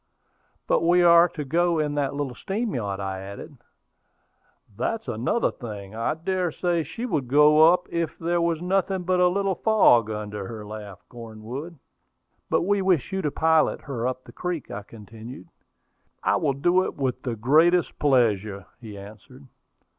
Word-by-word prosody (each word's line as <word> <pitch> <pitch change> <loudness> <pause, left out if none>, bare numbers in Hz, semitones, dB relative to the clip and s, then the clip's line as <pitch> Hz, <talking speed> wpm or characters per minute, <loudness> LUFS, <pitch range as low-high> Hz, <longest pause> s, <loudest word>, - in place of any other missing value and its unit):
"But - - +2
we 175 +1 +4
are 170 0 +6
to 150 -4 -6
go 170 +4 +1
in 150 -1 0
that 140 -1 -1
little 140 -3 -3
steam 210 - -3
yacht," 100 -5 -3
I 95 -1 -4
added. 100 - -9 1.2
"That's 225 - -3
another 120 - 0
thing; 105 -5 -9
I 115 +6 -1
dare 180 +1 -2
say 175 +1 0
she 230 +9 -6
would 155 - -2
go 150 +4 +6
up 180 0 0
if 170 -1 -2
there 170 +1 0
was 170 -1 -1
nothing 190 0 0
but 180 +1 +1
a 180 - +5
little 195 +1 0
fog 175 - +4
under 105 -2 -5
her," 110 -2 -8
laughed 105 -2 -10
Cornwood. 120 +7 -8 0.7
"But - - +2
we 200 +2 +1
wish 185 -8 +1
you 190 - -1
to 150 - 0
pilot 160 +2 +2
her 125 -4 -3
up 130 0 -4
the - - -14
creek," 180 -4 -5
I 100 - -5
continued. 110 0 -12 0.7
"I - - +2
will 140 -3 0
do 175 +7 +2
it - - -4
with 130 -2 -2
the 120 -2 -3
greatest 160 +10 +3
pleasure," 110 - +1
he 110 -4 -10
answered. 110 +7 -13
145 Hz, 170 wpm, -24 LUFS, 110-175 Hz, 1.2 s, are